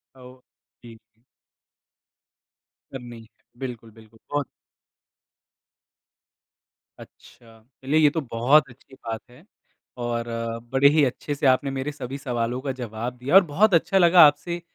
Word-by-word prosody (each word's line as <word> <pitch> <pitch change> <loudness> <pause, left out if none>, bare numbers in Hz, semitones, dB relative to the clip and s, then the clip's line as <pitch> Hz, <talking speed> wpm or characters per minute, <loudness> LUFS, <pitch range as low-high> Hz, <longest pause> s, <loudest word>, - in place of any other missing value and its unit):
औ 130 - -16 0.6
जी। 115 -1 -13 1.9
करनी 120 -3 -10 0.3
बिल्कुल, 120 -4 -8
बिल्कुल। 110 0 -20
बहुत। 145 -2 -2 2.5
अच्छा। 115 -1 -17 0.2
चलिए 150 +4 +1
ये 150 -2 +5
तो 160 +2 -3
बहुत 135 +4 +2
अच्छी 130 +2 -20
बात 115 -4 -7
है 125 +7 -18 0.6
और 120 0 -3 0.5
बड़े 135 +1 +4
ही 150 0 +3
अच्छे 145 +3 -4
से 145 0 -4
आपने 135 +1 +2
मेरे 135 +2 -4
सभी 135 -1 -7
सवालों 125 -2 -3
का 135 -1 -3
जवाब 120 0 -6
दिया 135 +8 -1
और 195 - +9
बहुत 185 +7 +2
अच्छा 180 +3 +2
लगा 175 -1 +6
आपसे, 170 +4 -3
130 Hz, 125 wpm, -23 LUFS, 120-145 Hz, 2.5 s, और